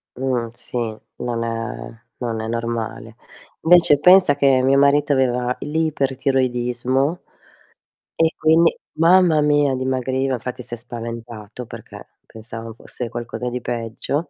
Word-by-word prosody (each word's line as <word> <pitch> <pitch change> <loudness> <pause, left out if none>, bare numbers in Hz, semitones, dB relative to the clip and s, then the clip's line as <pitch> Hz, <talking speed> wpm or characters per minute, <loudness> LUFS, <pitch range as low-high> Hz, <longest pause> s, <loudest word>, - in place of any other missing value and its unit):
Mhmm, 125 -3 -1
sì, 120 - -4 0.4
non 120 -1 -3
è 115 0 -6
non 115 -3 -3
è 110 - -4
normale. 115 -1 -4 0.5
Vece 165 -4 +5
pensa 180 -5 +6
che 135 -2 +3
mio 135 +1 +4
marito 145 +1 +3
aveva 125 -1 +1
l'ipertiroidismo 135 -2 0 1.0
e 165 0 +4
quindi, 165 +2 +4 0.2
mamma 165 -2 +4
mia, 145 -2 +2
dimagriva. 130 +1 -1
Infatti 125 +1 -5
si 120 - -8
è - - -4
spaventato 115 -1 -8
perché - - -11 0.2
pensava 115 0 -8
fosse 115 +1 -7
qualcosa 120 +1 -5
di 125 0 -4
peggio, 120 +7 -3
125 Hz, 120 wpm, -21 LUFS, 115-145 Hz, 1.0 s, pensa